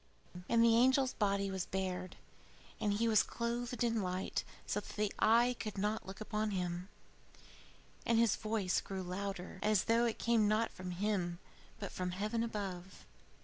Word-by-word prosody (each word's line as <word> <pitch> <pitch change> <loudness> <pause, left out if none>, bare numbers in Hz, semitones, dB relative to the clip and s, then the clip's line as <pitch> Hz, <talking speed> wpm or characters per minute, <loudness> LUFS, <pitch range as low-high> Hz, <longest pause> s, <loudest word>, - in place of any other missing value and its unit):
XII 180 - -8
And 230 0 +5
the 230 -1 +6
angel's 260 +2 +4
body 200 -2 0
was 190 -2 -3
bared, 185 -1 -3 0.6
and 205 -1 +1
he 225 +3 +1
was 220 -2 +5
clothed 240 +1 -2
in 230 -2 +1
light 185 0 -2 0.2
so 210 - -1
that 210 0 -2
eye 240 +3 +5
could 215 -2 -4
not 210 +1 -1
look 190 - -8
on 215 0 +1
him; 180 -1 -3 1.1
and 230 - +2
his 230 -3 +4
voice 215 -4 0
grew 190 -1 -5
louder, 185 0 -5
as 210 -2 +3
though 230 +1 +3
it 230 - -1
came 230 -3 +3
not 215 +2 +2
from 185 0 -7
him 180 -2 -1 0.4
but - - -5
from 180 -1 -3
heaven 215 +4 -1
above. 195 -5 -5
210 Hz, 165 wpm, -35 LUFS, 185-230 Hz, 1.1 s, the